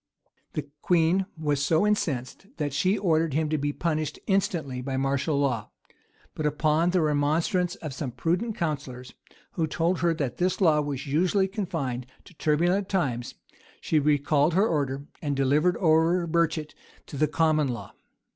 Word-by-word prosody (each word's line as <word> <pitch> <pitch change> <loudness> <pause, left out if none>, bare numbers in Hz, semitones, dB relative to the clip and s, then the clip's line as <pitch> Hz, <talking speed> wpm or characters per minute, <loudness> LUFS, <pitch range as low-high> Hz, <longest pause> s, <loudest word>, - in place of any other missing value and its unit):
The 150 - -3 0.2
queen 175 +2 +2
was 145 -3 0
so 160 +5 +3
incensed, 165 -6 -1
that 145 -2 -2
she 185 +8 +2
ordered 160 -5 +1
him 155 0 +1
to 155 - +1
be 145 +1 -1
punished 155 -1 -2
instantly 165 -9 0
by 130 +1 -3
martial 140 +2 0
law; 125 -7 -1 0.6
but 155 - -1
upon 155 +3 +2
the 180 -1 +2
remonstrance 160 +5 +1
of 155 -7 -7
some 135 0 -4
prudent 175 - -1
counsellors, 140 -6 -4 0.4
who 160 -2 -1
told 170 +3 0
her 170 -1 +2
that 140 -6 -3
this 185 +1 0
law 160 -6 +4
was 145 -2 -4
usually 180 +7 +2
confined 155 - -3 0.2
to - - -16
turbulent 175 +6 +1
times, 130 -11 -1 0.4
she 155 - +1
recalled 150 +2 +2
her 200 +4 +4
order, 140 - -1 0.2
and 145 -3 -1
delivered 145 +6 +2
over 165 +1 +3
Burchet 165 -2 0 0.3
to - - -10
the 155 +2 +2
common 155 0 +2
law. 120 -2 -5
155 Hz, 155 wpm, -26 LUFS, 140-175 Hz, 0.6 s, law